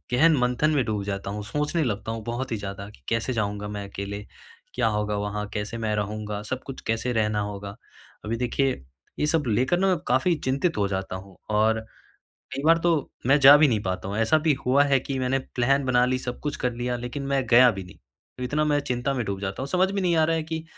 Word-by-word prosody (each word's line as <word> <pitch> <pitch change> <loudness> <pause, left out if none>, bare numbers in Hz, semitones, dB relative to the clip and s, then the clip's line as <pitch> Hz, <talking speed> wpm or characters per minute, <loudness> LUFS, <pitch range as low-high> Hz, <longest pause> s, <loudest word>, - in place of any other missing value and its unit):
गहन 160 +5 +5
मंथन 125 +4 +2
में 145 -4 +2
डूब 105 -2 -2
जाता 100 -1 -4
हूँ, 105 +1 -5
सोचने 150 +8 -1
लगता 110 -3 -2
हूँ 115 -1 -5
बहुत 120 +2 -3
ही 110 - 0
ज़्यादा, 100 0 -6
कि 105 - -18
कैसे 115 +3 0
जाऊँगा 105 -2 -2
मैं 100 -1 -5
अकेले, 100 +1 -6 0.5
क्या - - +1
होगा 105 0 -1
वहाँ, 105 +1 -3
कैसे 105 +2 -3
मैं 110 -2 -1
रहूँगा, 105 0 -3
सब 130 +5 -4
कुछ 135 - -7
कैसे 115 +2 0
रहना 105 -2 +1
होगा? 100 -1 -5 0.5
अभी 110 +2 -1
देखिए 125 - 0 0.4
ये - - +2
सब 160 0 +2
लेकर 125 +10 +2
ना, 195 - +3
मैं 185 -2 +3
काफ़ी 130 +8 +3
चिंतित 140 +6 0
हो 100 - +2
जाता 95 -1 -3
हूँ, 95 0 -10
और 110 +1 +2 0.8
कई 135 - -3
बार 165 +1 +6
तो, 165 -4 +1 0.2
मैं 135 +3 +5
जा 140 +2 +10
भी 150 0 +5
नहीं 110 -5 +1
पाता 95 0 -3
हूँ, 100 - -3
ऐसा 115 +8 +4
भी 155 0 +2
हुआ 135 +3 +5
है 140 -2 +3
कि 135 +1 -4
मैंने 130 +1 +1 0.2
प्लान 135 +3 +2
बना 125 -1 +3
ली, 130 0 0
सब 125 -1 -5
कुछ 150 - -3
कर 125 - -1
लिया। 120 +1 -2
लेकिन 125 +4 -5
मैं 135 -1 +1
गया 125 +1 +7
भी 95 -3 -5
नहीं, 90 - -14 0.4
तो - - -5
इतना 150 +4 0
मैं 150 -1 +2
चिंता 125 0 -2
में 125 -3 -1
डूब 100 -2 -4
जाता 100 +4 -4
हूँ। 135 - -4
समझ 185 +4 +2
में 200 - -1
नहीं 175 -2 +2
आ 160 - +4
रहा 165 +1 +1
है, 160 - -1
कि 160 0 -5
125 Hz, 240 wpm, -25 LUFS, 105-140 Hz, 0.8 s, जा